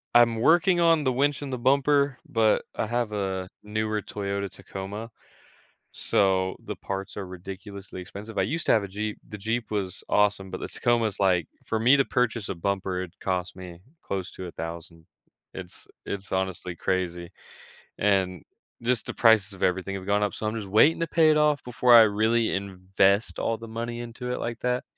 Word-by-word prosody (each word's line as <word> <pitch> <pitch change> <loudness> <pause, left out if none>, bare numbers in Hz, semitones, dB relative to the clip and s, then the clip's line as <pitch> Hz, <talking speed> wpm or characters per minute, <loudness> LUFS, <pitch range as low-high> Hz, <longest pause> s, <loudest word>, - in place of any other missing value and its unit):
I'm 120 -1 +6
working 175 +5 +4
on 165 -3 +4
the 130 - +2
winch 140 +3 +1
and 135 -2 -5
the - - -1
bumper, 140 +1 +3
but 110 -2 +3
I - - -1
have 120 -1 -1
a 95 -2 -2
newer 110 0 -1
Toyota 100 -1 -3
Tacoma, 100 +4 -7 0.8
so 95 -1 +1
the - - -4
parts 95 +1 -5
are 95 - -4
ridiculously 95 +1 -8
expensive, 105 +4 -9
I 95 - +3
used 155 - -2
to - - +5
have 110 - +3
a - - -4
Jeep, 105 +2 -4
the 105 - -8
Jeep 110 +2 -2
was 100 -4 -3
awesome, 105 -2 +2
but 95 - -5
the - - -3
Tacoma 120 -2 +1
is, 100 -2 -6
like 90 -4 +2 0.2
for 110 - -1
me 125 +5 +6
to 135 - +3
purchase 120 -4 0
a - - -2
bumper, 95 +1 -2
it 90 - -10
cost 90 -1 -2
me 90 -2 -10 0.2
close 95 -2 -4
to 95 - -7
1,000 85 -1 -7 0.5
it's 90 -2 -9 0.2
it's 100 0 -5
honestly 95 -1 -2
crazy, 90 -1 -2 0.7
and 95 -4 +1 0.4
just 120 0 0
the - - -5
prices 110 -4 +4
of 95 - -12
everything 95 +1 0
have 95 -1 -8
gone 100 +1 +2
up, 105 - 0
so 110 - -4
I'm 110 - -1
just 105 -3 -5
waiting 110 +13 +5
to 165 - +1
pay 160 -1 +4
it 155 - +4
off 150 -1 +3
before 125 0 +4
I 115 - +10
really 110 +2 +2
invest 95 +1 +1
all 115 - 0
the 115 - -9
money 120 +1 -4
into 120 +1 -5
it - - -3
like 115 0 -3
that, 125 0 0
105 Hz, 190 wpm, -26 LUFS, 95-120 Hz, 0.8 s, I